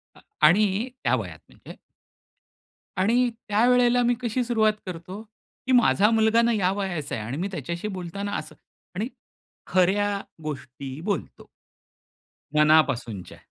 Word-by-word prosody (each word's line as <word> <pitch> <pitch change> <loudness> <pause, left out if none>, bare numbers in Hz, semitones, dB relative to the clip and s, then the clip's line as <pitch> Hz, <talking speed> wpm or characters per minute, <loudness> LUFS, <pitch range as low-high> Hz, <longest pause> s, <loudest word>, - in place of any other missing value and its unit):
अ - - -17 0.3
आणि 205 +6 +2
त्या - - +3
वयात - - -6
म्हणजे. - - -13 1.2
आणि 235 +6 +3 0.2
त्यावेळेला 245 +3 +4
मी 240 +1 +3
कशी 245 +1 -1
सुरुवात 220 -3 +2
करतो, 185 +3 -7 0.5
की - - +1
माझा 230 -4 +4
मुलगा 225 +1 +4
ना 235 0 +2
या 190 -4 +1
वयाचा 190 -7 -3
आहे 110 - -4
आणि 130 +6 -4
मी 185 +4 -2
त्याच्याशी 170 +4 -4
बोलताना 195 +1 -5
असं - - -8 0.4
आणि 210 +5 -2 0.6
खऱ्या 200 +2 +2 0.2
गोष्टी 135 -2 -7
बोलतो. 195 -2 -4 1.1
मनापासूनच्या. 135 - +2
195 Hz, 125 wpm, -25 LUFS, 165-220 Hz, 1.2 s, त्यावेळेला